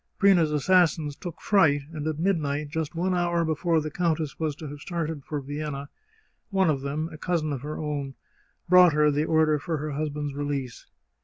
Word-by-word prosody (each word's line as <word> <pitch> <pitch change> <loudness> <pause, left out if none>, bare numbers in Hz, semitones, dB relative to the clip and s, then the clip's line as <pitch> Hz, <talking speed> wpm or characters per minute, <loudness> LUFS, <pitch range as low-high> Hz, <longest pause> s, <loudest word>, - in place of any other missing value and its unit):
Prina's 180 -6 +4
assassins 155 -1 +2
took 175 +1 -8
fright, 155 -8 +3
and 155 -1 -4
at 155 -2 -2
midnight, 150 -5 0
just 160 +1 -3
one 180 +3 0
hour 175 -1 +1
before 160 +1 +1
the 155 0 -4
countess 160 -3 -1
was 155 -3 -1
to 155 - -8
have 145 0 -8
started 160 -3 -4
for 150 +1 -4
Vienna, 145 0 -5 0.6
one 190 -5 +3
of 140 -3 -2
them, 145 +3 -2
a 155 - -10
cousin 160 -4 -1
of 135 - -4
her 150 +2 -5
own, 145 -3 -4 0.5
brought 180 -2 +7
her 150 0 +4
the 150 +2 0
order 160 -2 +3
for 165 +1 -3
her 150 +1 -4
husband's 145 0 -3
release. 140 -3 -4
155 Hz, 185 wpm, -26 LUFS, 145-165 Hz, 0.6 s, brought